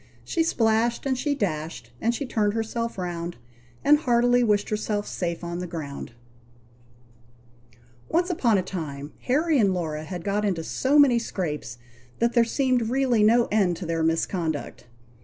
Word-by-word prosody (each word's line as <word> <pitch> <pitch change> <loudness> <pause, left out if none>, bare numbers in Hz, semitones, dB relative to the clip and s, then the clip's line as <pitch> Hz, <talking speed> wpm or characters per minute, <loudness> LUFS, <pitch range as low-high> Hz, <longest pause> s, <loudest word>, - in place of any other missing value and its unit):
She 335 - -1
splashed, 230 -6 +1
and 265 -1 +1
she 285 +3 -1
dashed, 155 - -3
and 235 +1 +1
she 280 - -3
turned 215 -4 0
herself 230 0 -3
round, 175 -2 -4 0.5
And 295 +1 +6
heartily 245 -2 +3
wished 210 -3 +1
herself 210 -1 -1
safe 170 -1 -3
on 170 0 -4
the 180 - -4
ground. 145 -7 -6 2.0
Once 355 +3 +1
upon 235 - +2
a 185 - 0
time 150 -6 -6
Harry 300 +3 +2
and 195 -4 +3
Laura 155 -3 -3
had 175 +2 -6
got 205 +2 0
into 185 -6 0
so 265 - +1
many 265 -5 +6
scrapes, 150 - -4 0.4
that 235 +1 +1
there 235 - +5
seemed 250 -1 +1
really 255 -3 +2
no 230 +3 +5
end 190 -5 +2
to - - -6
their 165 0 -1
misconduct. 165 -4 -1
210 Hz, 160 wpm, -25 LUFS, 170-245 Hz, 2.0 s, And